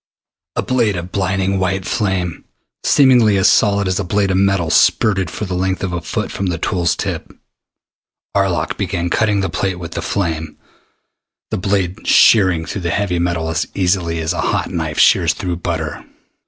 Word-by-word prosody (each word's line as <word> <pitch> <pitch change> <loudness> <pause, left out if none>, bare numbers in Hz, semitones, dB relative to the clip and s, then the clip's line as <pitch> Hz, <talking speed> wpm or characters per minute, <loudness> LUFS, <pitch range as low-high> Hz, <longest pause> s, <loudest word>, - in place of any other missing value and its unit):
A - - -1
blade 120 -6 +1
of 90 +1 -6
blinding 95 0 0
white 95 0 -1
flame, 95 -7 -2 0.4
seemingly 125 -7 +4
as 95 - +4
solid 100 -2 +3
as 95 +1 0
a - - -1
blade 100 +2 0
of 95 - +1
metal, 95 -4 +1
spurted 95 -5 +3
for 105 - -5
the 90 - -5
length 95 +1 -1
of 95 -2 -2
a 85 - -2
foot - - -3
from 95 - -3
the 85 -2 -1
tool's 85 +1 0
tip. - - -4 1.0
Arlok 95 -3 0
began 85 -2 -2
cutting 105 -2 +1
the 95 - 0
plate 95 +2 -2
with 85 -2 -7
the - - -4
flame, 80 -5 -3 0.9
the - - -1
blade 95 -2 -2
shearing 95 -6 +5
through 100 - -5
the 85 - -2
heavy 90 -1 -1
metal 85 -2 -1
as 80 0 -1
easily 90 -3 0
as 80 -1 -1
a - - -2
hot - - -1
knife - - -3
shears - - +4
through 90 -2 -3
butter. 85 - -4
95 Hz, 180 wpm, -17 LUFS, 85-100 Hz, 1.0 s, shearing